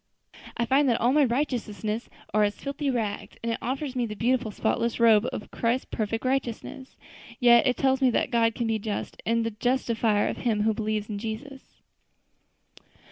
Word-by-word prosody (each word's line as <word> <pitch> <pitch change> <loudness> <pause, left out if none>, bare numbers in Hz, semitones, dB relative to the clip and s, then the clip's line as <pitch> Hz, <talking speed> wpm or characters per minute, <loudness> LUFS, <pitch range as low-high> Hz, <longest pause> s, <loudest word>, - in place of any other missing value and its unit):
I 235 - +1
find 270 +2 +3
that 235 - +2
all 245 +3 +3
my 295 -1 +5
righteousnesses 235 -4 -2 0.2
are 215 - +3
as 205 0 +1
filthy 280 +1 -3
rags, 220 -5 -3
and 230 - -1
it 230 - -2
offers 265 +2 -3
me 245 -2 0
the 210 - -6
beautiful, 235 +1 +1
spotless 230 +3 -1
robe 225 -1 +5
of - - -7
Christ's 235 +2 0
perfect 225 +2 -2
righteousness. 260 0 -3 0.4
Yes, 235 -1 +7
it 250 - +1
tells 265 0 +2
me 260 - +5
that 240 - 0
God 230 -1 +2
can 235 - -2
be 225 -1 0
just, 210 0 -5
and 230 0 +2
the 230 - -1
justifier 225 -2 +1
of - - -3
him 215 -4 0
who 220 0 +2
believes 215 -1 -2
in 205 -2 -4
Jesus." 265 +6 -8
235 Hz, 185 wpm, -26 LUFS, 220-255 Hz, 0.4 s, Yes